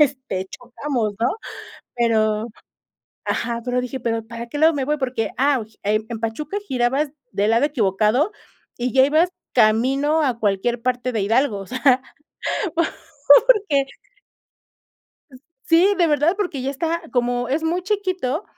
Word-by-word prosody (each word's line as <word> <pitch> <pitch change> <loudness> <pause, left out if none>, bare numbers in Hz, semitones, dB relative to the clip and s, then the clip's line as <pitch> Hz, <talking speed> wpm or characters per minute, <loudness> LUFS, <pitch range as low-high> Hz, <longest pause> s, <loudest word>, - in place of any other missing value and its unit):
este, 260 -10 0
chocamos," 245 -3 -3
¿no?, 235 +2 +2 0.7
pero 220 -2 +1 0.8
ajá, 235 -1 -2
pero 250 0 0
dije: 255 +1 -5
"Pero, 225 -1 -2
¿para 235 0 -7
qué 290 - -6
lado 320 +2 +5
me 270 -2 -2
voy?" 300 +1 0
Porque, 250 -4 -2
ah, 275 -2 +2 0.2
en 215 +2 0
Pachuca 275 - -3
girabas 265 +4 0 0.2
del 205 +3 +1
lado 230 +5 +3
equivocado 225 - +1 0.5
y 245 0 -2
ya 265 0 +6
ibas 315 +5 +3 0.2
camino 265 +7 +3
a 245 -4 0
cualquier 220 +3 0
parte 250 0 -1
de 220 -3 -1
Hidalgo 225 +2 +1
o 195 - -7
sea 255 0 +2 1.3
porque 350 - +5 1.8
Sí 355 +5 +4
de 345 -2 +3
verdad 300 +5 +2
porque 355 -10 -2
ya 265 - -2
está 330 +4 -2
como 245 -1 0
es 290 +5 -1
muy 345 +3 0
chiquito 370 -6 -1
255 Hz, 140 wpm, -21 LUFS, 230-300 Hz, 1.8 s, ya